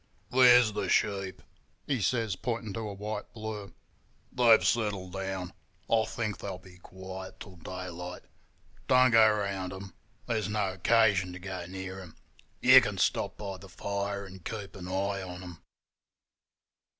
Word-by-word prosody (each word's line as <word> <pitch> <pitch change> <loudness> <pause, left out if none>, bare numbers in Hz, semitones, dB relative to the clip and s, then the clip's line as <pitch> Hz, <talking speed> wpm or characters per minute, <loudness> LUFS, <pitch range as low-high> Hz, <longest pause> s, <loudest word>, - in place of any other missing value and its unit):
'There's 125 -3 +7
the 105 - -2
sheep,' 95 -2 0 0.4
he 135 -6 -1
says, 110 -1 0
pointing 115 -1 -3
to - - -4
a 110 -2 -4
white 105 +1 -5
blur. 110 -3 -6 0.6
'They've 120 -3 +5
settled 100 -5 0
down. 95 -2 -4 0.3
I 110 -1 +3
think 110 -3 -3
they'll 95 -2 -5
be 90 -1 -16
quiet 95 +1 -9
till 95 -3 -11
daylight. 90 +1 -7 0.6
Don't 130 -1 +5
go 110 -1 +7
round 100 -3 -2
them; 95 0 -9 0.3
there's 110 -4 -1
no 105 -3 0
occasion 95 -2 +3
to 90 - -8
go 90 -1 -6
near 95 +1 -6
'em. 90 -4 -11 0.5
You - - +9
can - - -3
stop - - 0
by 100 -2 -5
the 95 0 -13
fire 100 +1 -3
and 95 -1 -12
keep 100 -1 -6
an 90 -2 -8
eye 95 +1 -1
on 90 -1 -7
'em. 90 -2 -10
100 Hz, 150 wpm, -29 LUFS, 95-110 Hz, 0.6 s, You